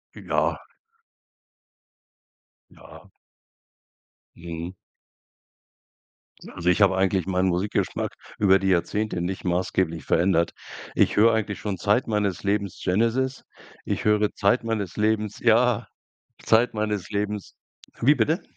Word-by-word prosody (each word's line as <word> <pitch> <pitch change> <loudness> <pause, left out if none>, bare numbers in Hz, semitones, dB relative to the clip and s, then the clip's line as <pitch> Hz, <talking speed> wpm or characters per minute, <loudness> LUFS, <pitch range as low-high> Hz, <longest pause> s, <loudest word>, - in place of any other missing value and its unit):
Ja. - - -1 2.1
Ja. - - -16 1.3
Mhm. 85 +1 -7 1.7
Na, - - -12
also, 85 - -1
ich 90 +4 +2
habe 95 -2 +4
eigentlich 95 -2 +1
meinen 95 0 +1
Musikgeschmack 90 +4 -1 0.3
über 95 -2 +5
die 95 - -2
Jahrzehnte 95 +2 0
nicht 90 +2 -4
maßgeblich 90 -2 -1
verändert. 85 -1 +2 0.4
Ich - - +3
höre 115 +2 +5
eigentlich 110 -2 -2
schon 100 -3 -3
Zeit 105 +7 +1
meines 105 -4 -1
Lebens 100 -1 -1
Genesis. 115 +7 0 0.4
Ich - - -2
höre 105 0 +2
Zeit 105 +5 +2
meines 110 -5 -3
Lebens 105 -1 0
ja, 120 0 +3 0.6
Zeit 115 +2 +3
meines 105 -4 -2
Lebens. 105 0 -3 0.5
Wie 140 +6 +5
bitte? 150 +6 0
100 Hz, 115 wpm, -24 LUFS, 90-110 Hz, 2.1 s, über